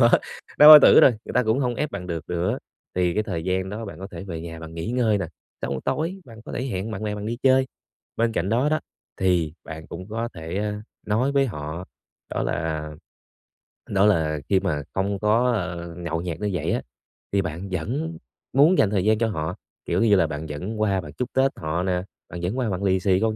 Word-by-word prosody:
Đó, 115 -1 +6 0.5
đau 150 - +10
bao 155 -1 +14
tử - - +8
rồi, - - +8
người - - -7
ta 125 - +4
cũng 110 +2 +1
hông 125 -3 0
ép 150 +4 -2
bạn 95 -3 -6
được 85 -3 -4
nữa, 90 +1 -1 0.4
thì 90 -1 +1
cái 105 - +1
thời 90 -7 -4
gian 95 +1 0
đó 110 +3 -5
bạn 100 -6 -8
có 95 - -6
thể 85 +1 -7
về 85 -4 -5
nhà 80 0 -8
bạn 80 0 -9
nghỉ 85 +6 -4
ngơi 120 -4 +2
nè, 95 - -2 0.4
xong - - -2
rồi 65 - -3
tối 170 +5 -1
bạn 115 -2 -13
có - - -8
thể 125 - -2
hẹn 105 -3 -3
bạn 105 -1 -5
bè 105 -1 -2
bạn 105 0 -5
đi 115 +2 -2
chơi. 130 0 +4 0.5
Bên 115 0 +1
cạnh 90 -3 -1
đó 120 +7 +2
đó 155 +1 +1 0.4
thì 90 -5 +1
bạn 80 0 -8
cũng 90 +3 -8
có 115 +2 -2
thể, 80 +1 -6
ơ, 105 +1 -1 0.3
nói 115 +7 +1
với 140 -1 +3
họ, 80 - -5 0.5
đó - - -1
là 80 -1 -2 1.0
đó 100 0 +3
là 80 -7 +2
khi 95 - +4
mà 80 -7 -1
không 100 +1 -1
có, 115 +4 +3
ờ, 85 -4 -4
nhậu 85 -1 -3
nhẹt 85 -2 -4
như 105 - 0
vậy 80 -1 -1
á, - - 0 0.5
thì 100 - +2
bạn 85 +2 -5
vẫn 140 - -3 0.4
muốn 150 +7 +5
dành 105 - +4
thời 100 -3 +1
gian 110 0 +4
cho 115 +1 +1
họ, 80 -7 -3 0.3
kiểu - - 0
như 105 -3 +5
là, 85 -4 +3
bạn 75 0 -5
vẫn 95 +9 -4
qua 100 -3 +2
bạn - - -10
chúc 125 0 -3
Tết 135 +1 +3
họ 80 +2 -2
nè, 90 -1 0 0.3
bạn 85 +1 -7
vẫn 90 +8 -2
qua 125 -4 0
bạn 95 0 -2
lì 95 -1 +3
xì 95 0 +2
con 110 +1 +1
95 Hz, 240 wpm, -24 LUFS, 85-115 Hz, 1.0 s, bao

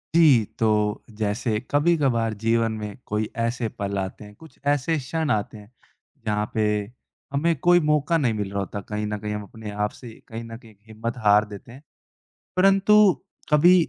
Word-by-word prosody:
जी, 140 -10 +6
तो 105 -2 +1
जैसे 105 +1 -1
कभी-कभार 145 -7 +2
जीवन 115 0 +2
में 105 -2 -6
कोई 105 +1 -2
ऐसे 115 0 -1
पल 100 0 -2
आते 95 +1 -4
हैं, 105 0 -12
कुछ 160 +5 -16
ऐसे 145 +3 +2
क्षण 155 +4 -2
आते 105 +1 -1
हैं, 105 +1 -15 0.5
जहाँ 105 -1 0
पे 110 - +1 0.7
हमें 165 +4 +2
कोई 175 +3 +5
मौका 150 +1 +2
नहीं 125 -7 +1
मिल 105 -2 -3
रहा 100 - -2
होता। 100 +1 -4
कहीं 105 +2 -4
न 105 0 -2
कहीं 105 0 -4
हम 105 0 -4
अपने 105 +1 -9
आप 105 0 -1
से 125 - -9 0.2
कहीं 115 +1 -6
न 115 0 -8
कहीं 115 -2 -17
हिम्मत 115 +2 -5
हार 105 +1 +6
देते 105 +3 -11
हैं। 130 +3 -12 0.8
परंतु 195 +2 +5 0.6
कभी 165 +5 +7
115 Hz, 175 wpm, -24 LUFS, 105-145 Hz, 0.8 s, कभी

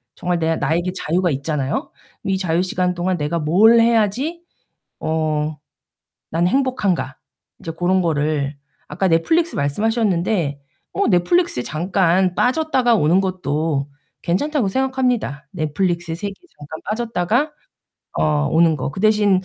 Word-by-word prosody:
정말 180 0 -1
내 165 -1 0
나에게 165 +5 0
자유가 175 0 0
있잖아요. 140 0 -2 0.4
'이 195 -1 +1
자유 175 -2 0
시간 180 -1 0
동안 180 +1 -1
내가 155 +3 -1
뭘 205 +10 +5
해야지 235 - +1 0.6
어 155 -1 -1 0.7
난 170 +2 +1
행복한가?' 205 - 0 0.4
이제 165 - -6
고런 180 +3 +1
거를 150 -3 -1 0.3
아까 190 - -1
넷플릭스 320 - +2
말씀하셨는데 180 - 0 0.3
어 400 - 0
넷플릭스에 185 - +2
잠깐 180 +4 +1
빠졌다가 255 - +2
오는 175 0 +3
것도 155 -6 -1 0.3
괜찮다고 265 - 0
생각합니다. 250 - -1
넷플릭스 170 +1 -1
세계에 200 +3 -5 0.2
잠깐 145 +2 -9
빠졌다가 230 - 0 0.7
어 75 -2 +2
오는 165 0 +4
거. 130 -1 -3
그 150 - -9
대신 210 -3 +3
180 Hz, 295 characters per minute, -20 LUFS, 155-215 Hz, 0.7 s, 뭘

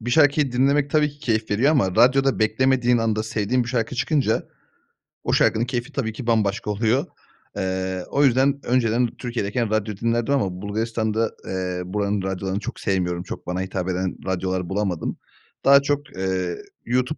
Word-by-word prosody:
bir 120 +2 -4
şarkıyı 145 -2 +4
dinlemek 140 +3 +2
tabii 150 -1 +3
ki 145 - -20
keyif 110 -6 -1
veriyor 115 +8 +3
ama 120 -12 +2
radyoda 135 +3 +4
beklemediğin 125 +2 +2
anda 110 -1 0
sevdiğim 110 +3 0
bir - - -7
şarkı 120 -1 -1
çıkınca, 130 +3 0 0.8
o - - 0
şarkının 115 +2 +3
keyfi 120 +3 -3
tabii 120 -6 -2
ki 120 +2 -7
bambaşka 105 -2 +1
oluyor. 115 +5 +1 0.5
Eee, 95 -1 -2
o 145 - +2
yüzden 135 +2 +3
önceden 120 -1 +2
Türkiye'deyken 120 -2 -2
radyo 110 -1 -1
dinlerdim 115 +4 0
ama 95 -8 -1
Bulgaristan'da, 110 +1 -1
eee, 90 -1 -3
buranın 100 +1 -1
radyolarını 95 +1 -2
çok - - -6
sevmiyorum, 90 -3 -1
çok - - -8
bana 90 +1 -2
hitap 95 -1 -3
eden 90 0 -1
radyolar 95 -1 -2
bulamadım. 95 -4 -2 0.5
Daha 140 0 +8
çok, 145 -3 -2
eee, 95 -2 -1 0.3
YouTube 125 +5 0
110 Hz, 160 wpm, -23 LUFS, 95-130 Hz, 0.8 s, Daha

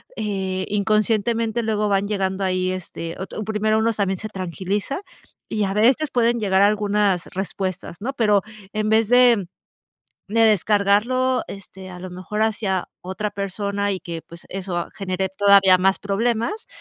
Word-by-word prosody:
eh, 190 -3 -2
inconscientemente, 215 +2 +1
luego 215 -1 0
van 200 0 +1
llegando 195 -1 -1
ahí, 185 0 0
este, 170 -2 -6
otr 190 - -7
un 215 - -4
primero 215 0 +1
uno 225 +1 +2
también 195 -2 -1
se 215 - -5
tranquiliza, 195 - -3 0.5
y 215 -1 0
a 195 - -2
veces 255 +8 +3
pueden 235 -1 +2
llegar 195 -3 +2
algunas 205 -3 +2
respuestas, 185 -2 -4
¿no? 260 +5 -3
Pero, 210 -5 +3 0.3
en 215 0 -1
vez 220 0 +3
de, 245 -6 +5 0.8
de 225 +3 +2
descargarlo, 215 +5 +3
este, 190 -1 -10
a 180 - -9
lo 185 +1 -7
mejor 185 +4 -4
hacia 205 -4 0
otra 190 +3 -4
persona, 200 +1 -2
y 190 - -2
que, 170 -2 -6
pues 170 +1 -12
eso 180 -2 -4
genere 190 -1 -2
todavía 195 -1 +5
más 190 +1 +2
problemas, 230 - -1
200 Hz, 155 wpm, -22 LUFS, 190-220 Hz, 0.8 s, de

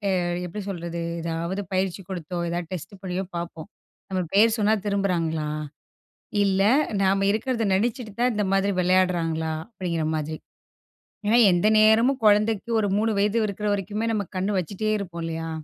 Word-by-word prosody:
அ - - +2 0.3
எப்டி 195 +5 -6
சொல்றது 170 -2 -4 0.2
ஏதாவது 170 +4 -3
பயிற்சி 185 0 -1
கொடுத்தோ, 175 -1 -4
ஏதாவது 170 -1 -3
டெஸ்ட் 180 +2 -6
பண்ணியோ, 185 0 -3
பார்ப்போம். 170 0 -6 0.4
"நம்ம 185 -1 0
பேரு 215 +3 +6
சொன்னா 215 0 +3
திரும்புறாங்களா? 170 -6 0 0.9
இல்ல 195 -1 +2 0.4
நாம 195 +1 +2
இருக்கறத 230 +2 -1
நெனைச்சுட்டு 220 +1 -1
தான் 250 0 +3
இந்த 210 -1 0
மாதிரி 195 +1 +2
வெளையாட்றாங்களா?" 170 -3 +1 0.2
அப்டிங்ற 175 -7 -3
மாதிரி. 155 0 -3 0.9
ஏன்னா 230 +3 +4
எந்த 175 +3 +2
நேரமும் 230 +5 +4
கொழந்தைக்கு 210 +2 +3
ஒரு 205 - 0
3 220 +1 +1
வயது 210 +3 +2
இருக்ற 210 +1 -4
வரைக்குமே 205 +3 -2
நாம 205 -4 -1
கண்ணு 190 +3 0
வச்சுட்டேருப்போம் 200 -1 -2
இல்லயா? 165 0 -4
190 Hz, 140 wpm, -25 LUFS, 170-210 Hz, 0.9 s, பேரு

